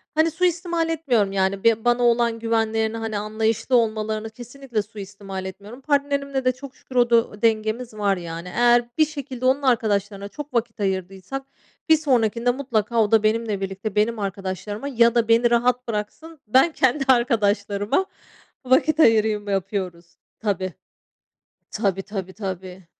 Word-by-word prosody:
hani, 315 +1 +3
suistimal 345 -1 0
etmiyorum 250 -11 +1
yani 195 0 0
be 230 0 +3
bana 240 0 +3
olan 235 -1 +2
güvenlerini 225 -1 0
hani 225 -2 -3
anlayışlı 220 +4 0
olmalarını 220 -1 0
kesinlikle 245 0 -5
suistimal 200 -2 -8
etmiyorum. 205 +7 -9
Partnerimle 280 -1 0
de 255 - +4
çok 260 +1 -11
şükür 260 - -14
o 240 -1 +4
du 230 -3 +2
dengemiz 225 +1 0
var 205 -2 0
yani 170 0 -7
eğer 240 0 +4
bir 310 - +5
şekilde 275 -4 -6
onun 265 +2 +3
arkadaşlarına 205 -6 0
çok 295 +4 -9
vakit 230 -2 -1
ayırdıysak 190 +6 -3 0.5
bir 320 - +7
sonrakinde 245 -5 +1
mutlaka 235 -4 0
o 205 - -2
da 220 -1 +4
benimle 215 -2 0
birlikte 195 +2 -4
benim 215 +2 +1
arkadaşlarıma 200 +4 -4
ya 235 -3 +3
da 230 -1 +2
beni 230 +1 +4
rahat 245 +1 +2
bıraksın. 235 +9 -5
Ben 260 +9 +4
kendi 270 -1 +1
arkadaşlarıma 215 - +2 0.6
vakit 260 +4 +3
ayırayım 215 -5 +3
yapıyoruz. 185 -3 -3 0.2
Tabii. 190 -4 -2 1.0
Tabii, 195 -3 -1
tabii, 190 -2 -6
tabii. 185 -2 -7
225 Hz, 145 wpm, -23 LUFS, 205-255 Hz, 1.0 s, bir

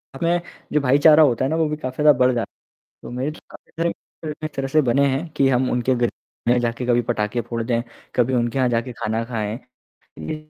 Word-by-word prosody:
इसमें 170 +4 +1 0.3
जो 150 - +3
भाईचारा 145 +4 +6
होता 130 -2 +2
है - - 0
ना 160 - 0
वो 160 - +2
भी 150 - -1
काफ़ी 130 0 -4
ज़्यादा 150 - +8
बढ़ 125 0 +5
जाता 120 -1 -2
है। - - -85
तो - - -8
मेरे 140 +4 -1 0.2
काफ़ी - - -16
सारे 170 +1 -1 0.4
मित्र 155 0 -6
इस - - -2
तरह 135 0 -2
से 155 - +5
बने 135 +2 +2
हैं 135 +5 -1
कि 135 - +4
हम 130 0 +2
उनके 125 +1 +1
घर 120 -1 +1 0.4
में 125 +1 +4
जाके 120 +1 -2
कभी 120 0 +3
पटाखे 105 +1 0
फोड़ 115 -1 -2
दें, 115 0 0 0.3
कभी 125 +1 +2
उनके 120 +2 0
यहाँ 130 -1 +2
जाके 120 +1 -1
खाना 110 0 -1
खाएँ। 115 -1 -3 0.6
ये 80 - -4
125 Hz, 230 wpm, -22 LUFS, 120-145 Hz, 0.6 s, ज़्यादा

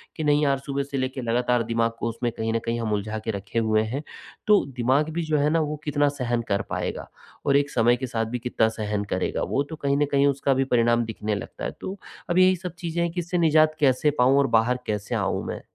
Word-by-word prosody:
कि 155 - -4
नहीं 150 0 +3
यार 140 -1 +2
सुबह 140 0 -3
से 140 0 -5
लेकर 130 0 -2
लगातार 120 +1 +1
दिमाग 115 0 0
को 115 - -1
उसमें 120 +1 -2
कहीं 110 0 -1
न 115 - +1
कहीं 115 0 -1
हम 110 -2 -1
उलझा 105 +1 -2
के 115 - 0
रखे 100 +3 -3
हुए 110 -1 +2
हैं। 130 +7 -4 0.4
तो 210 -1 +5
दिमाग 130 +6 +2
भी 170 +1 -1
जो 155 -1 0
है 145 +1 +2
ना, 165 +1 +2
वो 150 -1 -1
कितना 145 -1 +2
सहन 120 -1 0
कर 100 0 +1
पाएगा - - -3 0.4
और 140 0 +4
एक 145 0 +1
समय 120 +1 +3
के 130 0 -4
साथ 115 -2 -1
भी 120 +3 -4
कितना 115 -2 +1
सहन 105 -1 -1
करेगा - - -1
वो, 140 - 0
तो 160 +3 -8
कहीं 140 -2 0
न 145 - +3
कहीं 140 0 +4
उसका 140 0 +1
भी 135 +1 +1
परिणाम 120 0 +3
दिखने 105 -1 -3
लगता 100 - -6
है। - - -2
तो 195 +2 -5 0.3
अब 175 - +1
यही 185 0 +6
सब 180 -1 -7
चीज़ें 170 0 -2
हैं 170 - -1
कि 175 - -4
इससे 175 +1 -2
निज़ात 155 -1 +4
कैसे 145 +1 +3
पाऊँ 130 +3 +5
और 140 - +3
बाहर 125 +3 +1
कैसे 105 -1 -2
आऊँ - - -1
मैं? - - -5
130 Hz, 250 wpm, -25 LUFS, 115-150 Hz, 0.4 s, यही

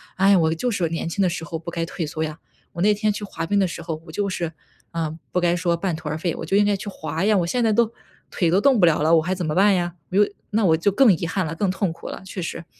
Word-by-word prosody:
哎 195 +1 +4
呀， 195 - +6
我 160 -1 +2
就 245 +9 -1
是 175 -5 0
年 165 0 -3
轻 200 +4 -2
的 185 - +3
时 165 -1 -4
候 165 -2 -5
不 170 - -7
该 165 0 -2
退 165 -1 -4
缩 155 +1 -3
呀， 155 +1 -5 0.3
我 170 - -4
那 210 - +5
天 215 0 +1
去 210 - -6
滑 165 -4 -4
冰 200 +3 +1
的 190 - +3
时 170 - -6
候， 160 -1 -5
我 160 - -10
就 200 +4 -1
是， 170 -3 -3 0.4
啊， 160 -2 -3 0.2
不 180 - +1
该 175 0 +2
说 170 0 +1
半 170 -1 -2
途 160 -1 -8
而 155 - -2
废， 170 0 -2
我 160 - -6
就 195 - 0
应 205 - +5
该 205 0 +2
去 195 +1 -7
滑 160 -1 -3
呀， 215 0 +4
我 170 -2 +1
现 245 +5 0
在 220 -2 +3
都， 230 0 +2 0.4
腿 170 -3 0
都 190 +3 +3
动 265 -3 +4
不 175 - +6
了 160 -3 +3
了， 160 +2 +4
我 160 - +4
还 185 +2 -1
怎 180 -1 -3
么 150 - -2
办 200 +1 +5
呀？ 175 -1 -1 0.2
我 190 - 0 0.3
那 220 +1 +1
我 160 -3 +4
就 185 +5 +2
更 230 +2 +5
遗 165 - -4
憾 185 +3 -1
了， 165 +1 -4
更 190 +1 0
痛 190 -2 -1
苦 165 - -9
了， - - -7
确 190 - -7
实。 170 0 -5
175 Hz, 340 characters per minute, -23 LUFS, 165-200 Hz, 0.4 s, 呀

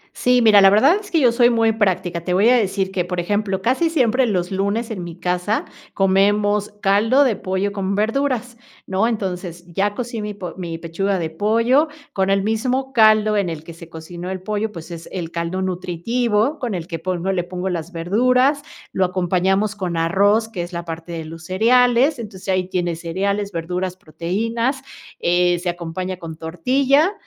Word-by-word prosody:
Sí, 250 -1 +3
mira, 210 -2 +7
la 195 - +8
verdad 270 - +5
es 410 - -12
que 330 - +2
yo 245 -4 +4
soy 240 0 +4
muy 225 -1 +3
práctica. 185 -5 0
Te 180 0 -1
voy 205 +5 +4
a 250 - +6
decir 195 -2 0
que, 180 -2 -1
por 180 0 -4
ejemplo, 200 +1 -1
casi 265 - +2
siempre 255 -5 +2
los 180 -4 -1
lunes 200 +4 -1
en 185 -5 -4
mi 170 -1 -8
casa 180 +4 -1 0.3
comemos 205 +2 +2
caldo 220 +8 +4
de 240 -6 +2
pollo 190 +2 -2
con 195 0 -2
verduras, 245 +2 -1 0.3
¿no?, 195 +4 +1
entonces, 180 -5 -4
ya 205 +2 0
cocí 240 -3 -4
mi 210 -1 -5
po 180 -4 -7
mi 170 -3 -5
pechuga 180 +4 -2
de 160 -2 -3
pollo 230 - +2 0.3
con 190 0 0
el 195 0 +2
mismo 255 +5 -1
caldo 215 -2 +5
en 190 -4 0
el 155 -2 -6
que 165 0 -10
se 165 0 -13
cocinó 170 +2 -8
el 190 -1 -4
pollo, 215 +1 -2
pues, 170 -1 -10
es 170 0 -8
el 170 -3 -5
caldo 170 +2 -3
nutritivo, 210 - -1
con 235 -6 -3
el 170 -2 -4
que 165 -2 -5
pongo 185 +1 -2
le 180 -2 -1
pongo 180 +1 -4
las 170 0 -4
verduras, 250 - +2 0.3
lo 190 - +1
acompañamos 190 +3 0
con 180 -4 -3
arroz, 200 +7 +2
que 190 -6 -5
es 175 +1 -7
la 170 0 -4
parte 165 +1 -7
de 165 -1 -5
los 165 +1 -10
cereales, 245 +7 +3
entonces, 205 -4 -9
ahí 185 -1 +1
tiene 175 -3 -1
cereales, 200 +5 -2
verduras, 180 +2 -3
proteínas, 230 - -2 0.4
eh, 175 0 +2
se 180 0 -2
acompaña 175 +2 -4
con 165 -3 -8
tortilla 270 - +2
195 Hz, 190 wpm, -20 LUFS, 175-225 Hz, 0.4 s, la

